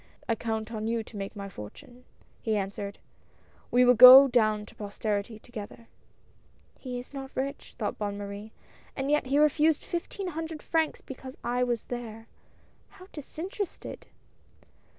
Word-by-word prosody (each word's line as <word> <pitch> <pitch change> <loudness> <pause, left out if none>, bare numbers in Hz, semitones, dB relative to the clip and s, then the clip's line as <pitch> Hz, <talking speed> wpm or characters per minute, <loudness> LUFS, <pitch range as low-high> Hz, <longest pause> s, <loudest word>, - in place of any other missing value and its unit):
"I 230 - +2
count 220 -1 -3
on 220 -1 -3
you 230 0 -1
to 220 - -15
make 200 +1 -5
my 200 -1 -6
fortune," 200 - -11 0.4
he 220 -2 0
answered. 200 0 -4 0.7
"We 250 +1 +5
will 250 - +7
go 255 +3 +11
down 215 -4 +2
to - - -15
posterity 210 +1 -3
together." 230 0 -10 0.5
" - - -34
He 250 -2 -5
is 245 +3 -9
not 270 -1 -6
rich," 275 +2 -4
thought 210 - -3
Bonne 205 -1 -3
Marie, 205 +1 -7 0.2
" - - -27
and 270 +1 -1
yet 295 -3 +2
he 275 +2 +2
refused 300 +1 +3
fifteen 360 +2 -4
hundred 320 -1 -6
francs 320 -1 0
because 260 0 -10
I 245 +1 0
was 240 -2 -1
there. 225 -2 -7 0.6
How 370 0 -16
disinterested 350 +6 -6
240 Hz, 155 wpm, -28 LUFS, 215-275 Hz, 0.7 s, go